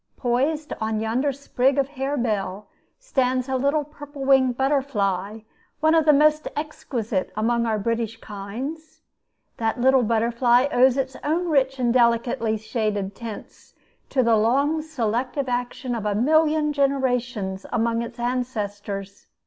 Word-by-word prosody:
Poised 285 +5 0
on 220 0 -1
yonder 240 +6 0
sprig 270 0 0
of 275 -1 +1
harebell 235 -8 -2 0.3
stands 260 - 0
a 265 - -1
little 280 +3 +1
purple 290 -1 -9
winged 260 -2 +4
butterfly, 220 -7 0 0.4
one 315 +1 +3
of 325 -2 +4
the 305 - +7
most 305 +1 +3
exquisite 240 -9 -3
among 235 +2 +1
our 220 -1 +1
British 225 +1 -2
kinds. 245 +12 -7 0.6
That 225 +1 -1
little 265 +1 +4
butterfly 235 +2 +3
owes 255 +1 +4
its 265 -1 -2
own 340 +4 0
rich 270 -3 +2
and 240 -2 +1
delicately 235 -2 +2
shaded 210 -3 -2
tints 225 0 -10 0.3
to 260 - +2
the 230 -1 +4
long 280 +8 +2
selective 260 -2 -2
action 245 +1 -3
of 220 -3 -2
a 205 - 0
million 305 +4 +3
generations 250 -8 -1
among 230 -1 +1
its 235 - -7
ancestors. 205 -5 -4
250 Hz, 135 wpm, -23 LUFS, 225-280 Hz, 0.6 s, the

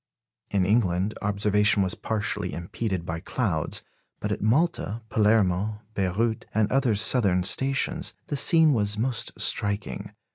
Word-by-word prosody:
In 95 -2 +1
England, 100 -1 +1
observation 105 0 +2
was 95 - -1
partially 105 -3 -3
impeded 90 +1 -4
by 80 0 -4
clouds; 85 - -2 0.4
but - - -3
at - - -3
Malta, 115 - 0
Palermo, 105 -1 +1
Beyrout, 105 +4 -1
and 110 -1 +1
other 130 -5 +2
southern 100 -4 +3
stations, 135 - +1
the 145 - -4
scene 160 +2 +5
was 105 -3 -1
most 120 +1 -2
striking. 100 0 -1
105 Hz, 130 wpm, -25 LUFS, 95-115 Hz, 0.4 s, scene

